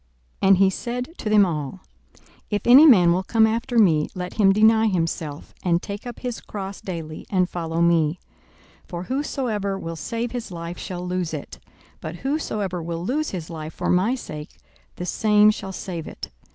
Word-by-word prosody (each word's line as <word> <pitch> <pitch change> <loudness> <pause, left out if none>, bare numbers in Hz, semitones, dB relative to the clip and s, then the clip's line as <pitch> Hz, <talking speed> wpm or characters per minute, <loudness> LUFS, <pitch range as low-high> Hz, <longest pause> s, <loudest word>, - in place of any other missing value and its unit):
42:009:023 195 - +3
And 195 - +7
he 195 0 +5
said 250 - -4
to 215 - -3
them 210 -2 +6
all, 155 0 -4 0.7
If 205 -2 -1
any 270 +6 +9
man 180 - +7
will 180 - +1
come 220 +3 +3
after 235 +3 -1
me, 160 -9 +4
let 180 -1 -5
him 200 -3 +4
deny 220 +2 +5
himself, 165 -5 -3
and 170 -2 +2
take 200 +5 -7
up 240 - -8
his 245 -2 -4
cross 195 -1 -7
daily, 165 -4 -6
and 185 -2 +2
follow 165 -2 -3
me. 170 -1 +2 0.7
42:009:024 - - -28
For 175 0 -5
whosoever 235 -6 -2
will 165 -3 -5
save 230 +9 -3
his 245 -2 -5
life 170 0 -6
shall 180 -2 -5
lose 180 -3 -2
it: 145 - -8 0.4
but 160 +2 -6
whosoever 210 - -2
will 165 +1 -4
lose 295 +7 -1
his 170 -3 -6
life 155 -1 -7
for - - -1
my 195 +8 +2
sake, 150 -11 -8 0.4
the 180 - -5
same 210 +2 +4
shall 195 -2 -6
save 175 -4 -6
it. - - -8
190 Hz, 185 wpm, -23 LUFS, 170-220 Hz, 0.7 s, any